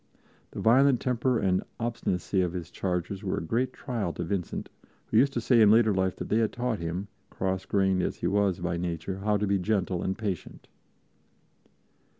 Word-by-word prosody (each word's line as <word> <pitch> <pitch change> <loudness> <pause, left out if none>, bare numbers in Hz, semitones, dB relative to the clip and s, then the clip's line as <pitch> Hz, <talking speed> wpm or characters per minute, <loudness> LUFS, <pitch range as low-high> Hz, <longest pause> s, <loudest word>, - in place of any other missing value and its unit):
The - - -8
violent 130 +2 +5
temper 125 0 +1
and 95 -3 +1 0.2
obstinacy 115 -5 -1
of 90 -2 -1
his 90 -1 -6
charges 90 +1 -3
were 95 - -1
a - - -3
great 120 +9 0
trial 115 -10 -3
to - - -4
Vincent, 95 -4 -3 0.4
who - - 0
used 140 +1 +5
to 120 - -1
say 115 0 +4
in 105 - +7
later 110 0 +5
life 95 -1 0
that - - -6
they 110 - +3
had 110 -2 +1
taught 120 -3 -2
him, 85 +4 -3 0.2
cross 95 0 -2
grained 95 -2 +2
as - - -1
he - - -6
was 100 -2 +2
by 85 0 -1
nature, 85 +2 -3
how 105 +1 +1
to 105 - 0
be 100 -1 +1
gentle 95 -2 0
and 95 +1 -2
patient. 100 -6 -5
100 Hz, 190 wpm, -28 LUFS, 90-115 Hz, 0.4 s, in